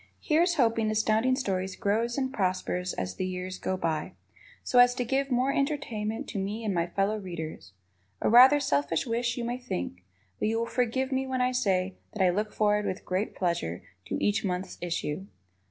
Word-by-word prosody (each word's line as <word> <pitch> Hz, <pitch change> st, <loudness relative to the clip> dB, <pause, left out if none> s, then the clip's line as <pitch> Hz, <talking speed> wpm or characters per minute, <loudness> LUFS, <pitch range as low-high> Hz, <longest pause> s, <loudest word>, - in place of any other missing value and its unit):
Here's 335 Hz, +3 st, +2 dB
hoping 225 Hz, -5 st, +2 dB
Astounding 220 Hz, +4 st, +2 dB
Stories 190 Hz, -7 st, -2 dB
grows 230 Hz, +4 st, 0 dB
and 265 Hz, -1 st, -1 dB
prospers 185 Hz, -3 st, -1 dB
as 90 Hz, 0 st, -3 dB
the 185 Hz, -, -1 dB
years 185 Hz, 0 st, -5 dB
go 185 Hz, -, -1 dB
by, 160 Hz, -3 st, -2 dB, 0.5 s
so 250 Hz, -, +3 dB
as 245 Hz, 0 st, +7 dB
to 250 Hz, -1 st, -1 dB
give 270 Hz, +3 st, 0 dB
more 255 Hz, +2 st, +2 dB
entertainment 235 Hz, -7 st, -2 dB
to 200 Hz, -, -3 dB
me 210 Hz, +4 st, -3 dB
and 205 Hz, -, 0 dB
my 170 Hz, -1 st, 0 dB
fellow 200 Hz, +4 st, 0 dB
readers. 160 Hz, -, -7 dB, 0.5 s
A -, -, 0 dB
rather 255 Hz, +5 st, +8 dB
selfish 145 Hz, -, 0 dB
wish, 235 Hz, 0 st, -1 dB
you 240 Hz, -, -2 dB
may 240 Hz, +1 st, -3 dB
think, 90 Hz, -, -4 dB, 0.4 s
but -, -, +1 dB
you 225 Hz, +1 st, +1 dB
will 230 Hz, -, 0 dB
forgive 250 Hz, +3 st, 0 dB
me 265 Hz, 0 st, 0 dB
when 260 Hz, -1 st, -1 dB
I 250 Hz, 0 st, +2 dB
say 190 Hz, -6 st, 0 dB, 0.2 s
that 205 Hz, -, +1 dB
I 180 Hz, -, +4 dB
look 210 Hz, +3 st, -1 dB
forward 210 Hz, -1 st, +1 dB
with 185 Hz, -, -4 dB
great 185 Hz, +4 st, -2 dB
pleasure 170 Hz, -, -2 dB, 0.2 s
to -, -, -2 dB
each 205 Hz, 0 st, +1 dB
month's 185 Hz, -1 st, -3 dB
issue. 170 Hz, +1 st, -3 dB
215 Hz, 190 wpm, -28 LUFS, 185-245 Hz, 0.5 s, rather